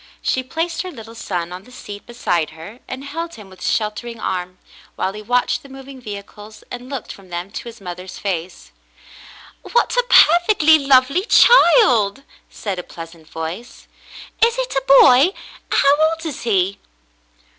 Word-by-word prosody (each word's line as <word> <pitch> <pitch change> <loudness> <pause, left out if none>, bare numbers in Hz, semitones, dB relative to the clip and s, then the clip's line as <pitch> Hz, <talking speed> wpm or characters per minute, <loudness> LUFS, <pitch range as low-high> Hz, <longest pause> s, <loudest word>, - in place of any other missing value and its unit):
She 260 - 0
placed 325 +6 -3
her 370 - -6
little 225 -6 -11
son 180 -6 -4
on 180 +1 -7
the 250 - -18
seat 205 -5 -10
beside 175 -9 -1
her 205 +9 -11
and 260 +1 -7
held 330 +4 -6
him 205 -3 -13
with 185 - -13
sheltering 225 +2 -2
arm, 180 0 -4 0.4
while 190 - -2
he 210 - -8
watched 245 +3 0
the 280 - -15
moving 270 0 -11
vehicles 210 0 -10
and 245 +1 -8
looked 275 -5 -6
from 195 -2 -14
them 175 +2 -6
to - - -7
his 235 0 -10
mother's 180 -1 -8
face. 180 -3 -5 0.9
"What 480 - 0
a - - +2
perfectly 325 -2 +6
lovely 275 +6 +3
child 335 - +5 0.2
!" - - -36
said 195 -4 -5
a - - -5
pleasant 165 -2 -11
voice. 165 +10 -7 0.6
"Is 465 +1 +3
it - - -3
a 270 - -1 0.2
boy.? 270 +9 +5 0.4
How 280 +1 +4
old 325 0 -6
is 305 -5 -5
he.?" 195 -3 +1
235 Hz, 165 wpm, -19 LUFS, 190-280 Hz, 0.9 s, perfectly